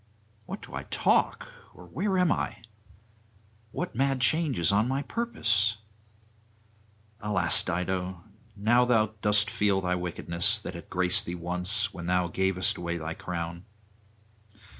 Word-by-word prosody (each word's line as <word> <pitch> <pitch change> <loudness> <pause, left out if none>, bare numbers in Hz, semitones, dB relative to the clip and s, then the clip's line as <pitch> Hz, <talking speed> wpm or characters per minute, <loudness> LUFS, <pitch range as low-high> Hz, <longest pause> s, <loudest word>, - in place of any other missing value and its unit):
What - - -7
do - - -12
I - - -3
talk? - - +1 0.2
or 90 - -13
where 185 - -1
am 180 -3 +3
I? - - -2 1.1
what - - -4
mad 135 +2 +1
change 150 +1 +3
is 85 0 +3
on 105 +3 +2
my 135 +2 -1
purpose? 115 - 0 1.4
Alas, 105 -2 +2
Dido! 90 0 -3 0.3
now 115 +4 +3
thou 110 -3 +2
dost 105 0 +3
feel 100 -2 +1
thy 90 -1 -1
wickedness; 90 +3 +1
that 105 - -7
had 85 - -10
graced 90 0 +3
thee 85 - -3
once, 90 +4 -1
when 85 -1 -7
thou 90 -1 +1
gavest 95 +1 +1
away 85 0 -3
thy 80 0 -4
crown. 85 0 -5
95 Hz, 140 wpm, -28 LUFS, 90-110 Hz, 1.4 s, am